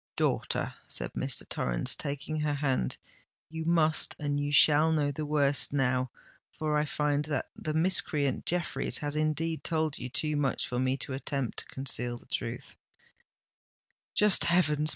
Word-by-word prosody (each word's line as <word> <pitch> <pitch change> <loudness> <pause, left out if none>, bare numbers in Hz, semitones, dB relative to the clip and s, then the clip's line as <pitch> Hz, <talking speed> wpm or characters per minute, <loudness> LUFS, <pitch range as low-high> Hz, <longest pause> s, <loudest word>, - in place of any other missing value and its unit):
"Daughter," - - 0
said - - -3
Mr. - - -3
Torrens, - - +1
taking 145 +2 -4
her 150 -1 0
hand, 135 - 0 0.5
"you 160 0 -4
must 160 -2 +3
and 145 -1 -1
you 145 0 -1
shall 150 +2 +5
know 150 -2 +1
the 150 +2 -4
worst 145 -2 +3
now—for 130 +3 -2
I 150 0 +2
find 150 0 0
that 145 -3 -3
the 155 0 -4
miscreant 160 -5 0
Jeffreys 175 0 -1
has 145 -1 -3
indeed 155 +1 0
told 155 -2 0
you 125 - -5
too 150 +3 -1
much 145 -2 0
for 125 - -2
me 130 +1 +1
to 135 - -4
attempt 135 -2 -3
to - - -5
conceal 125 -2 -3
the - - -18
truth——" - - -4 1.4
"Just 210 -2 +4
heavens! 155 -4 +2
150 Hz, 150 wpm, -30 LUFS, 135-155 Hz, 1.4 s, shall